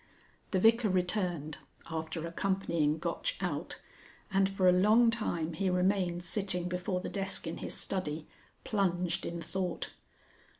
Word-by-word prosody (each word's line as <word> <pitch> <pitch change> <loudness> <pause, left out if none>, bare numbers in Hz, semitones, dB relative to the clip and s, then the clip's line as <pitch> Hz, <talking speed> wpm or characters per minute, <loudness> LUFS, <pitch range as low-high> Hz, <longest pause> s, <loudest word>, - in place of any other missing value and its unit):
The 190 - +1
Vicar 225 +2 +5
returned, 180 -5 0 0.3
after 160 0 -3
accompanying 170 -4 0
Gotch - - -2
out, - - -3 0.5
and 195 0 +3
for 195 -1 +2
a - - +8
long 215 +6 +5
time 170 -8 -1
he 190 +4 0
remained 180 -1 +1
sitting 180 -1 0
before 180 +1 -2
the - - -4
desk 195 -2 -1
in 165 0 -4
his - - -5
study, 155 -5 -2 0.4
plunged 180 -4 0
in 170 - -4
thought. 185 -2 -3
180 Hz, 135 wpm, -32 LUFS, 170-195 Hz, 0.5 s, a